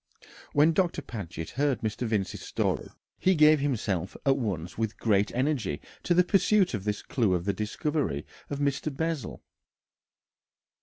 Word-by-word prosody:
When 150 +3 +5
Doctor 175 +1 +1
Paget 85 -7 -6
heard 140 -2 0
Mr. 110 +2 -2
Vincey's 105 -4 -1
story, - - -1 0.3
he 190 0 +3
gave 155 -1 +6
himself 105 - -1
at 135 -1 +5
once 95 - -3
with 110 -1 -2
great 105 -2 +2
energy 125 - 0 0.2
to 175 - +1
the 180 - +6
pursuit 195 -1 +3
of 100 -3 -3
this 105 -1 -2
clue 105 -8 +1
to 85 - -6
the 100 +1 0
discovery 110 - -2 0.2
of 145 - -3
Mr. 140 +1 0
Bessel. 160 -4 -3
125 Hz, 150 wpm, -28 LUFS, 105-150 Hz, 0.3 s, gave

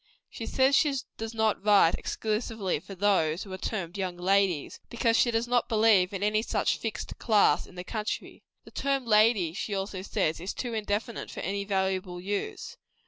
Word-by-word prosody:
She - - -6
says 265 +1 +3
she 290 -1 +3 0.2
does 225 +1 -5
not 220 -2 +1
write 205 -5 +5
exclusively 215 -4 -2
for 195 +4 -10
those 185 -4 +1
who 195 - -9
are - - -4
termed 190 -3 -4
young 185 -2 -3
ladies; 185 -3 +1
because 230 -1 +1
she 240 - +4
does 230 0 0
not 245 0 +1
believe 215 -5 +4
in 200 0 -4
any 210 +1 +2
such - - 0
fixed 225 -2 -5
class, 215 -4 +3
in - - -16
the 180 - -6
country. 215 +2 -4 0.2
The - - -15
term 275 -2 -1
lady, 210 -6 +4
she 200 +2 -3
also 195 -1 -4
says, 185 -5 -1
is 180 +4 -5
too 245 -2 -4
indefinite 215 +1 -3
for - - -7
any 200 +1 -2
valuable 190 -2 -1
use. 205 - -4
205 Hz, 185 wpm, -28 LUFS, 190-225 Hz, 0.2 s, write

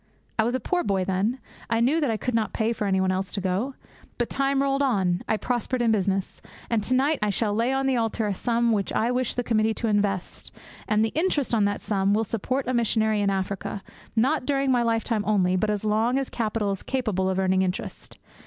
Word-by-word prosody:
I - - +5
was 240 +3 0
a - - 0
poor 355 +3 -1
boy 190 -2 0
then; 195 +7 0 0.3
I 225 - +2
knew 275 +8 +2
that 290 - +1
I 225 - 0
could 250 +3 -3
not 225 -1 0
pay 225 +1 0
for 210 -2 -2
anybody 190 -1 +2
else 190 +1 -2
to 205 - -2
go. 195 +8 -1 0.4
But 240 - -2
time 275 0 +1
rolled 275 0 +1
on. 195 -9 +1
I 220 - +2
prospered 245 +2 -2
in 235 -2 +3
business. 195 -2 -1 0.3
And 230 -2 +2
to 255 - +1
night 285 +4 +2
I 210 - +1
shall 205 +1 0
lay 230 +4 +1
on 270 0 0
the 265 -2 +2
altar 225 -1 0
a 205 - 0
sum 235 +3 +1
which 205 -3 0
I 230 +2 +1
wish 250 -1 -1
the 245 - -1
committee 220 -1 +1
to 230 - -2
invest, 205 -3 -1 0.4
and 215 +1 +3
the - - -1
interest 305 - 0
on 215 -3 +3
that 205 0 -1
sum 200 -1 +1
will 220 - +2
support 250 +5 -2
a 255 - -1
missionary 220 -2 +1
in 200 - +2
Africa, 195 +1 -3 0.3
not 255 +4 +1
during 275 -2 +1
my 245 -1 +3
lifetime 225 -2 0
only, 185 -4 +2
but 210 +3 +1
as 210 0 -1
long 220 +4 +2
as 270 -1 -2
capital 215 -3 -1
is 195 - -4
capable 215 -8 -1
of 190 - -1
earning 190 0 +2
interest. 185 0 -4
220 Hz, 230 wpm, -25 LUFS, 200-250 Hz, 0.4 s, I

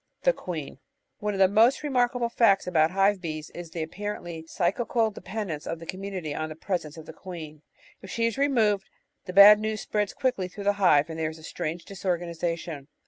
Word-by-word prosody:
The - - +4
Queen 160 - -6 0.4
One 210 -1 -2
of - - -4
the 190 - +7
most 225 +9 +4
remarkable 245 -4 +1
facts 215 -5 +3
about 160 -3 +3
hive 195 +1 +2
bees 155 -3 -5
is 175 -1 -8
the 165 0 -4
apparently 170 -2 -6
psychical 220 +6 0
dependence 200 -7 -5
of 165 - -3
the 165 - -10
commiuiity 185 -4 -5
on 155 0 -3
the 155 - -7
pres 175 +1 -2
ence 150 +1 -11
of 160 - -10
the - - -10
queen. 160 -5 -9 0.4
If 190 - -11
she 230 +3 0
is 230 - 0
removed, 225 -8 +2 0.4
the 180 - -6
bad 205 +2 +10
news 215 0 -2
spreads 210 -1 -2
quickly 250 -8 0
through 200 +2 -9
the 205 +1 +3
hive 150 -4 +4
and 160 - -6
there 155 -1 0
is 160 - -10
a 160 - -15
strange 165 +1 -4
disorganisation. 170 -5 -3
185 Hz, 200 wpm, -27 LUFS, 160-210 Hz, 0.4 s, bad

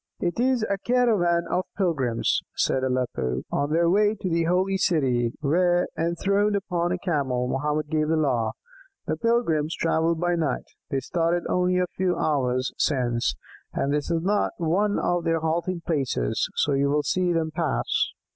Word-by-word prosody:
"It 175 +4 -2
is 255 -2 +2
a 200 0 -1
caravan 210 -9 +2
of 185 - -1
pilgrims," 140 - +1
said 130 - +1
Aleppo, 125 - -1
"on 145 +1 -1
their 170 +2 +3
way 205 +4 +3
to 190 -2 -4
the 165 0 +1
Holy 185 +3 +1
City, 130 -11 +1
where, 175 +4 +2
enthroned 200 +5 +1
upon 175 -3 -1
a 180 - 0
Camel, 140 -9 -1
Mohammed 150 +3 -1
gave 155 -1 +1
the 160 - +2
law. 125 -7 +1 0.5
The - - -1
pilgrims 170 -10 +1
travel 165 0 +1
by 175 +2 0
night; 160 -6 -1 0.2
they 135 - -1
started 170 +4 0
only 180 0 +1
a 180 - +2
few 185 -1 +1
hours 130 -4 0
since, 120 -5 +1 0.4
and 140 - 0
this 150 -1 -1
is 165 -1 0
not 205 +2 +1
one 190 +5 +1
of 175 -1 0
their 165 -1 0
halting 170 +2 -1
places, 130 - -1
so 145 - +1
you 140 +1 +2
will 150 +1 +1
see 180 +2 +1
them 165 -2 0
pass." 160 -3 -1
165 Hz, 165 wpm, -25 LUFS, 140-180 Hz, 0.5 s, their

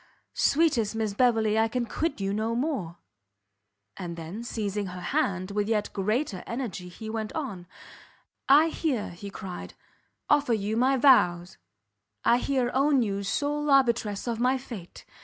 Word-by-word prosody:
sweetest 275 -9 +2
Miss 220 -2 -1
Beverley, 220 -2 +3
I 225 - +3
can 240 +1 -2
quit 310 +4 -2
you 195 0 -1
no 220 +2 -1
more!" 235 - -2 1.0
And 175 -3 -6
then, 170 +8 -6
seizing 210 -3 -3
her 180 0 -7
hand, 185 +1 -1
with 205 +1 -1
yet 210 -2 0
greater 210 0 -1
energy, 225 -7 -4
he 220 +5 -9
went 220 -1 -3
on, 210 - -5 0.8
"I 300 +4 +7
here," 285 -9 -2
he 190 +4 -8
cried, 190 -2 -8 0.5
"offer 290 -5 +3
you 210 +1 -2
my 260 +3 +3
vows, 180 -10 +4 0.7
I 240 - +5
here 255 -2 0
own 275 -1 +3
you 200 -2 -2
sole 295 +8 -1
arbitress 235 -7 +2
of 230 -1 -2
my 255 +2 +2
fate! 230 -9 -10
220 Hz, 150 wpm, -27 LUFS, 195-260 Hz, 1.0 s, I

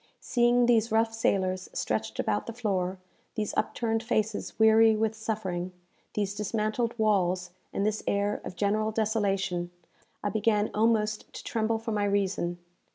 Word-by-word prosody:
Seeing 240 0 +3
these 230 -1 +3
rough 225 0 +2
sailors 185 -4 0
stretched 110 0 -2
about 105 0 -1
the - - -4
floor, 195 -5 -1 0.4
these 215 -3 -2
upturned 225 -1 0
faces 220 -2 -1
weary 220 0 +6
with 220 0 +1
suffering, 195 -5 -3 0.4
these 205 -1 0
dismantled 215 +3 -1
walls, 185 -5 +1 0.2
and 200 - -1
this 215 0 0
air 200 +1 0
of - - -7
general 210 +4 +1
desolation, 195 -5 0 0.5
I 205 - +1
began 210 -1 +1
almost 215 -1 +1
to - - -8
tremble 225 0 0
for 225 +1 -5
my 205 -1 +1
reason. 195 -3 0
215 Hz, 145 wpm, -28 LUFS, 195-225 Hz, 0.5 s, weary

